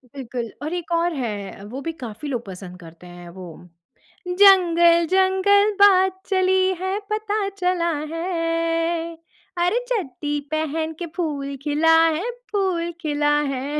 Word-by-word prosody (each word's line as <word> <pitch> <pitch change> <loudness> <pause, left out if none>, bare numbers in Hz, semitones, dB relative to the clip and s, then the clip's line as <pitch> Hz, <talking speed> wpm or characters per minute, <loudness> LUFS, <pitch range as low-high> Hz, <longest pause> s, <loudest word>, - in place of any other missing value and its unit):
बिल्कुल। 240 -3 -5
और 310 - -3
एक 350 -1 -5
और 335 0 +1
है 205 -7 -5
वो 245 +6 -7
भी 330 - -3
काफ़ी 235 +4 -7
लोग 245 -4 -3
पसंद 180 -1 -10
करते 170 +1 -14
हैं 175 0 -11
वो 185 - -8 0.8
जंगल-जंगल 375 +2 +4
बात 380 -1 +5
चली 375 -1 +2 0.2
है 380 +2 -1
पता 425 -1 -1
चला 360 -3 -1 0.2
है, 330 -1 -1 0.4
अरे 355 +7 +2
चड्डी 295 - -2
पहन 315 +1 -2
के 345 - -3
फूल 285 -5 -3
खिला 315 +2 +3 0.2
है, 405 +10 -3 0.2
फूल 365 -4 -1
खिला 295 -2 0
है। 275 +1 -3
330 Hz, 130 wpm, -22 LUFS, 280-375 Hz, 0.8 s, बात